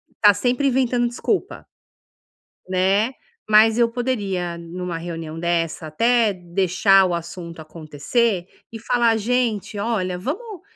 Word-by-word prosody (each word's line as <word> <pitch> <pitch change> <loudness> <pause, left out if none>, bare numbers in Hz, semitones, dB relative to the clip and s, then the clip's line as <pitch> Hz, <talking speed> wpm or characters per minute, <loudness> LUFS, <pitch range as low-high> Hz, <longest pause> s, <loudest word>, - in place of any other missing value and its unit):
está 205 -1 +6
sempre 250 +6 0
inventando 250 -2 +1
desculpa 370 - -3 1.0
né, 195 +6 +2 0.4
mas 220 +1 +6
eu 235 -1 +3
poderia, 200 -8 -2
numa 170 0 -6
reunião 165 -1 -6
dessa, 165 -2 -1
até 230 +6 +2
deixar 190 +2 +3
o 180 - -1
assunto 170 -1 -6
acontecer 170 - -2 0.2
e 225 - -8
falar: 230 0 +2
"Gente, 225 -3 -1
olha, 195 -5 -1
vamos 365 - -5
200 Hz, 115 wpm, -21 LUFS, 175-235 Hz, 1.0 s, está